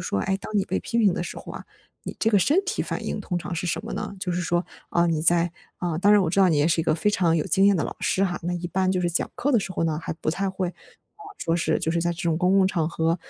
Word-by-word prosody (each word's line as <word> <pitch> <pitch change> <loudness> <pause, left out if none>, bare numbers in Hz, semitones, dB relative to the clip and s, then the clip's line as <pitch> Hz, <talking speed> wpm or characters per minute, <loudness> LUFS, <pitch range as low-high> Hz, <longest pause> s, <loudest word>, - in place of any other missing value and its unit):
说， 100 - -1
诶， 195 - 0
当 210 +2 -5
你 195 - +2
被 - - -1
批 235 - -2
评 205 -5 +4
的 175 - -2
时 - - -7
候 - - -8
啊， - - -8 0.4
你 - - -6
这 225 - +3
个 205 - +5
身 295 - +3
体 400 +4 -2
反 - - -3
应 - - -3
通 180 - -3
常 175 - -5
是 175 +2 -3
什 195 - -2
么 225 - -6
呢？ 210 -1 -4
就 180 - -2
是 180 - -1
说， 175 +1 0 0.3
啊， 170 0 +3
你 160 -2 0
在， 170 +1 +3 0.3
啊， 170 -3 -2
当 205 +3 +4
然 205 -2 +6
我 165 - 0
知 190 - -1
道 185 - +6
你 155 - +2
也 145 +2 +3
是 165 0 +2
一 - - -3
个 - - +2
非 210 +6 +1
常 170 -4 +2
有 155 - 0
经 195 +1 +3
验 200 - +4
的 160 - 0
老 - - -5
师 195 - +1
哈， 175 -2 -2
那 175 +1 -1
一 175 0 -4
般 185 +1 +1
就 185 - 0
是 175 -1 0
讲 170 - -1
课 285 - -1
的 235 - +5
时 190 - -5
候 - - -2
呢， 155 -1 0
还 - - -3
不 160 - -6
太 195 +3 -1
会， 185 -1 -2
啊， 425 - -22 0.2
说 165 - 0
是 170 - +1
就 160 - -1
是 170 - 0
在 175 +1 0
这 175 +4 -7
种 165 -2 +1
公 185 +3 +2
共 190 - +5
场 165 -5 0
合， 165 0 0
175 Hz, 345 characters per minute, -24 LUFS, 165-195 Hz, 0.4 s, 然